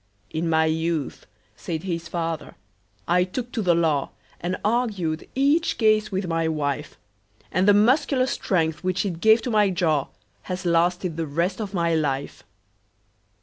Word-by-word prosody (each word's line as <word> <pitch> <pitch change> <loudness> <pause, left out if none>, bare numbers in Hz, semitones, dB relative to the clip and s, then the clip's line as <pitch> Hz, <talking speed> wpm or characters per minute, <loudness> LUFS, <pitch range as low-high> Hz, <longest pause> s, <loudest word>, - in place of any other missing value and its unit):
"In 165 +1 -2
my 160 0 +3
youth," 160 -2 -2 0.3
said 160 - -5
his 170 -3 -3
fater, 165 -1 -4 0.5
"I 180 +1 +3
took 240 +7 -5
to 225 - -2
the 175 -4 +3
law, 160 -4 +1 0.3
And 180 +2 -2
argued 205 -9 -1
each 285 +5 +2
case 215 -1 +3
with 190 0 -1
my 165 -1 0
wife; 150 -2 -2 0.5
And 185 +3 +2
the 205 - +7
muscular 255 +4 +3
strength, 165 -10 -1
which 185 +1 0
it 175 -4 -3
gave 220 +1 +5
to 250 - -2
my 210 -2 +4
jaw, 160 -7 +1 0.4
Has 185 0 -4
lasted 175 0 +1
the 165 -1 -2
rest 170 +8 -1
of 205 -2 -5
my 170 -1 +1
life." 145 -3 -1
175 Hz, 155 wpm, -24 LUFS, 160-205 Hz, 0.5 s, the